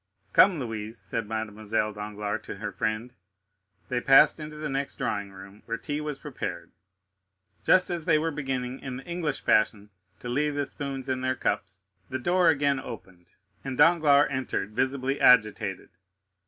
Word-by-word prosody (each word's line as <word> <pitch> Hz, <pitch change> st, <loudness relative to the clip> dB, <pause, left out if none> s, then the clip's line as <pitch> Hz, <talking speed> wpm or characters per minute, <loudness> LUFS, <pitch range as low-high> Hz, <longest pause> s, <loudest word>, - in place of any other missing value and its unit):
"Come, 190 Hz, -3 st, +6 dB
Louise," 115 Hz, -2 st, -5 dB
said 115 Hz, -2 st, -4 dB
Mademoiselle 110 Hz, 0 st, -2 dB
Danglars 105 Hz, 0 st, -4 dB
to -, -, -6 dB
her -, -, -5 dB
friend. 110 Hz, +3 st, -3 dB, 0.7 s
They 125 Hz, -1 st, -1 dB
passed 135 Hz, +4 st, +6 dB
into 150 Hz, 0 st, -7 dB
the 150 Hz, 0 st, -4 dB
next 135 Hz, 0 st, -2 dB
drawing 100 Hz, -1 st, -3 dB
room, 95 Hz, +1 st, -13 dB
where 115 Hz, -, -2 dB
tea 145 Hz, +2 st, -4 dB
was 150 Hz, -2 st, -4 dB
prepared. -, -, -6 dB, 0.9 s
Just 185 Hz, -1 st, +4 dB
as 170 Hz, -3 st, -3 dB
they 155 Hz, -, +4 dB
were 165 Hz, +1 st, 0 dB
beginning, 135 Hz, -3 st, -3 dB
in 130 Hz, -2 st, -6 dB
the 135 Hz, -, -10 dB
English 170 Hz, -3 st, -3 dB
fashion, 105 Hz, -1 st, +2 dB, 0.3 s
to -, -, -8 dB
leave 145 Hz, +4 st, 0 dB
the 145 Hz, 0 st, 0 dB
spoons 135 Hz, -1 st, -5 dB
in 130 Hz, -1 st, -1 dB
their 130 Hz, 0 st, 0 dB
cups, 95 Hz, -5 st, -3 dB, 0.2 s
the 130 Hz, -, -2 dB
door 175 Hz, +6 st, +3 dB
again 140 Hz, -3 st, +2 dB
opened 95 Hz, -8 st, -10 dB, 0.4 s
and 135 Hz, -2 st, -5 dB
Danglars 150 Hz, -2 st, +5 dB
entered, 130 Hz, -6 st, -2 dB
visibly 130 Hz, +3 st, -1 dB
agitated. 105 Hz, -5 st, +3 dB
130 Hz, 160 wpm, -27 LUFS, 110-145 Hz, 0.9 s, Come